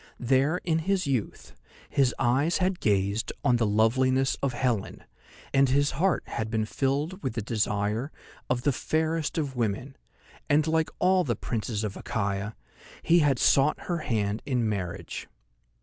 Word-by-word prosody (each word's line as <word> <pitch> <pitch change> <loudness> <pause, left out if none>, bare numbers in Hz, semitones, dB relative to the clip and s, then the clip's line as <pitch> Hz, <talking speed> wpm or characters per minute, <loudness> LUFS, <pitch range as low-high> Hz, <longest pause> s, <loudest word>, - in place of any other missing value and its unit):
There, 135 +7 +2
in 165 -2 +1
his 190 +2 0
youth, 130 -7 -3 0.3
his 135 -3 +1
eyes 135 +7 +2
had 185 -1 0
gazed 100 +1 0
on 125 - +3
the 115 -2 +1
loveliness 130 +5 +2
of 140 -2 0
Helen, 120 -5 -2 0.5
and 135 -1 +4
his 140 +2 +2
heart 180 +8 +1
had 110 -1 -4
been 110 -1 0
filled 145 - -1
with 130 - -3
the 115 - -1
desire 105 +4 -1 0.4
of 125 -1 0
the 145 - +3
fairest 160 +6 -1
of 140 -4 -2
women, 125 +4 -2 0.5
and 150 +1 +4
like 160 0 +1
all 185 0 +3
the 120 -7 -1
princes 110 0 -3
of 105 -2 -3
Achaia 100 -1 -3 0.5
he 170 +1 +5
had 145 -5 +3
sought 140 +4 +3
her 175 -1 -2
hand 110 -6 -1
in 125 -5 0
marriage. 95 -5 -4
130 Hz, 155 wpm, -27 LUFS, 110-150 Hz, 0.5 s, he